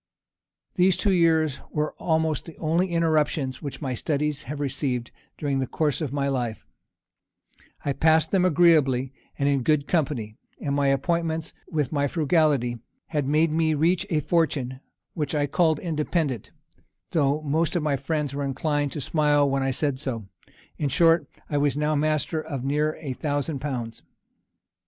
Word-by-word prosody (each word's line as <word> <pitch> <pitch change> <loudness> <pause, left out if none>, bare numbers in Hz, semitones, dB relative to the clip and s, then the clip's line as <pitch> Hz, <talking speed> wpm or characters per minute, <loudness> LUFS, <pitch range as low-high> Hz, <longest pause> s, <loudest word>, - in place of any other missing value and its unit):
These 185 0 +4
two 200 - +1
years 160 -5 +3
were 150 0 -1
almost 160 -2 0
the 165 - -11
only 170 +3 +1
interruptions 155 -6 0
which 145 +1 -6
my 130 -2 -1
studies 150 +3 -2
have 145 +3 -5
received 130 -3 -2 0.3
during 140 -2 -1
the 130 - -1
course 150 +2 -1
of 150 -5 -2
my 140 -1 0
life: 120 -5 -2 1.2
I 140 - +1
passed 160 +1 +3
them 190 -2 +3
agreeably, 150 -7 +4 0.2
and 140 - +1
in 140 -2 +2
good 145 +2 +1
company; 130 -10 -1 0.2
and 140 - -2
my 140 -1 +2
appointments, 160 +3 0 0.2
with 150 -5 -1
my 145 -2 +1
frugality, 145 -6 +1 0.3
had 150 -4 -1
made 155 +2 +3
me 160 0 +2
reach 175 +5 +2
a 155 -4 +1
fortune 140 -6 0 0.3
which 150 -1 -2
I 145 -1 +2
called 160 +1 +2
independent, 155 - -2 0.6
though 150 -1 +1
most 160 +4 0
of 170 - +1
my 150 -2 +1
friends 145 +1 -2
were 140 0 -2
inclined 145 +1 -1
to 150 - -4
smile 145 -1 +2
when 135 0 0
I 135 - +1
said 135 0 -1
so: 120 -7 -4 0.5
in 145 - 0
short, 165 +3 +4 0.2
I 145 - 0
was 145 0 +1
now 150 +1 +1
master 155 +1 0
of 140 -5 -5
near 150 +2 +1
a 140 -4 -3
thousand 145 +1 -2
pounds. 125 -5 -4
150 Hz, 160 wpm, -25 LUFS, 140-160 Hz, 1.2 s, These